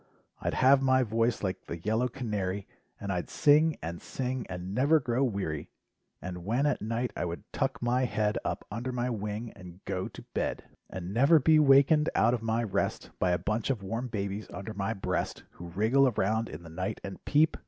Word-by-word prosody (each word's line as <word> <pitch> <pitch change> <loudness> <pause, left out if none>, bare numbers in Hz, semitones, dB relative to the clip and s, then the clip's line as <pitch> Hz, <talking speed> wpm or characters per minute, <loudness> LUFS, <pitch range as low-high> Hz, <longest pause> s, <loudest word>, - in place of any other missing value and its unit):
I'd - - -2
have 135 +1 +5
my 130 -1 +4
voice 115 0 0
like 95 -2 -3
the 85 - -4
yellow 110 +8 0
canary. 105 -6 -3 0.3
And 100 - -3
I'd 90 -2 -2
sing 150 +2 +4
and 85 +1 -5
sing 130 -1 -3
and 90 +1 -5
never 145 +7 +4
grow 125 -1 0
weary. 95 - -2 0.5
And 90 -1 -6
when 120 +9 +1
at 145 - +1
night 115 +3 -2
I - - -2
would 85 0 -5
tuck - - -1
my 125 +2 +2
head 105 -3 0
Up - - -3
under 120 +4 -3
my 125 0 -1
wing 105 +1 -4
and 90 -1 -13
go 95 -1 -2
to - - -11
bed, - - -1
18 - - -26
LIFE - - -26
WAVES - - -33 0.2
And 95 - -5
never 140 +8 +6
be 155 +3 +5
wakened 145 +2 +5
out 115 +2 +4
of 120 - -1
my 115 +1 0
rest 105 -5 -2
By 90 - +2
a 90 - +3
bunch 110 +7 -2
of 120 -7 -1
warm 115 +6 -3
babies 100 -2 -3
under 100 +2 -6
my 105 +2 -2
breast, 90 -2 -2
Who 85 - -10
wriggle 110 +10 +3
around 110 -1 0
in 75 +3 -8
the 85 - -10
night 90 +3 -3
and 100 -1 -7
peep. 155 +2 +3
110 Hz, 210 wpm, -29 LUFS, 95-130 Hz, 0.5 s, never